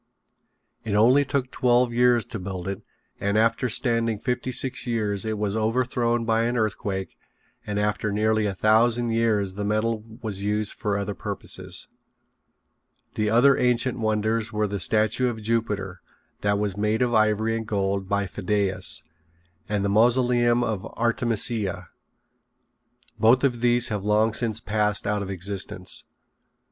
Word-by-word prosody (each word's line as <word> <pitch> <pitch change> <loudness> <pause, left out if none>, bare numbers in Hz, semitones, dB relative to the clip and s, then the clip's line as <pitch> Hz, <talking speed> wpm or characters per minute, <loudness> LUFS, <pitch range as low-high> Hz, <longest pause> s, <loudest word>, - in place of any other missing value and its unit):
It 110 -3 -2
only 125 +7 +5
took 135 -2 -2
twelve 125 -1 +2
years 120 -1 +3
to 115 - -6
build 95 -1 -6
it 100 0 -4 0.4
and 100 +1 0
after 115 +3 +2
standing 115 -2 +1
fifty 125 +3 -2
six 130 +1 0
years 105 -4 -1
it 110 -1 -2
was 105 0 -2
overthrown 120 +1 0
by 115 0 +2
an 120 +1 -1
earthquake 100 -4 -3 0.5
and 105 -1 -2
after 105 0 -1
nearly 110 +1 +1
a 100 - -3
thousand 115 +3 +3
years 110 -4 +1
the 105 +2 -4
metal 110 +1 0 0.2
was 100 -3 -4
used 105 +1 -1
for 105 -2 -2
other 100 0 -3
purposes. - - -6 1.3
The 105 0 0
other 125 +5 +5
ancient 125 0 +1
wonders 110 0 0
were 105 -1 0
the 100 0 -4
Statue 110 +6 +2
of 115 -2 -5
Jupiter 105 -5 -2 0.4
that 100 0 +1
was 100 -2 -1
made 105 +3 +1
of 120 -1 0
ivory 110 +1 +2
and 110 -1 -4
gold 100 -2 -1
by 100 0 +1
Phidias, 95 -3 -1 0.7
and 105 -1 0
the - - +1
Mausoleum 120 +2 +3
of 105 -5 -2
Artemisia. 115 -5 -1 1.3
Both 115 +5 +4
of 120 -4 +1
these 120 0 +3
have 105 -3 -3
long 105 +2 +2
since 110 -2 +1
passed 105 0 0
out 105 0 0
of 100 - -5
existence. 95 -1 -3
110 Hz, 150 wpm, -24 LUFS, 100-120 Hz, 1.3 s, only